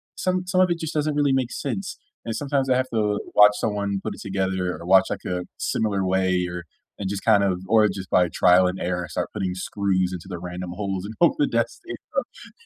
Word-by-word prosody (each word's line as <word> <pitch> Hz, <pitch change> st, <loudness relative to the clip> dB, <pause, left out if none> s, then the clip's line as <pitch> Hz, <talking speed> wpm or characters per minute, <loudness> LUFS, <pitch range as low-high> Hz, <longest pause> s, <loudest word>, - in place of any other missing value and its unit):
some 185 Hz, 0 st, -1 dB
some 185 Hz, 0 st, +3 dB
of 185 Hz, -, +4 dB
it 170 Hz, -, -1 dB
just 160 Hz, 0 st, -4 dB
doesn't 150 Hz, 0 st, 0 dB
really 145 Hz, -2 st, +2 dB
make 130 Hz, -2 st, 0 dB
sense, 115 Hz, -9 st, -4 dB, 0.3 s
and 115 Hz, -, -3 dB
sometimes 135 Hz, 0 st, -1 dB
I 130 Hz, -, +4 dB
have 130 Hz, 0 st, -1 dB
to 105 Hz, -2 st, +1 dB, 0.2 s
watch 105 Hz, 0 st, +8 dB
someone 100 Hz, -2 st, -1 dB
put 105 Hz, -2 st, -4 dB
it -, -, -12 dB
together 95 Hz, -3 st, -2 dB
or 85 Hz, -, -9 dB
watch 95 Hz, 0 st, +6 dB
like -, -, -5 dB
a 90 Hz, 0 st, -2 dB, 0.2 s
similar 100 Hz, -3 st, -1 dB
way 95 Hz, -1 st, +1 dB
or 90 Hz, -1 st, -6 dB, 0.4 s
and 95 Hz, -2 st, -3 dB
just 100 Hz, -1 st, -4 dB
kind 105 Hz, -3 st, +4 dB
of 90 Hz, -1 st, -1 dB
or 110 Hz, 0 st, +5 dB
just 95 Hz, -1 st, -6 dB
by 90 Hz, -1 st, +4 dB
trial 90 Hz, 0 st, +5 dB
and 90 Hz, +1 st, -2 dB
error 90 Hz, -1 st, -2 dB
start -, -, -3 dB
putting 95 Hz, -2 st, -2 dB
screws 95 Hz, -1 st, -1 dB
into 90 Hz, 0 st, -7 dB
the 90 Hz, -, -5 dB
random 90 Hz, 0 st, -6 dB
holes 95 Hz, -1 st, -3 dB
and 110 Hz, -, -6 dB
hope 170 Hz, -, +6 dB
the 295 Hz, -2 st, +2 dB
desk -, -, -1 dB
stays -, -, -7 dB, 0.5 s
up. -, -, -25 dB
100 Hz, 230 wpm, -24 LUFS, 90-120 Hz, 0.5 s, watch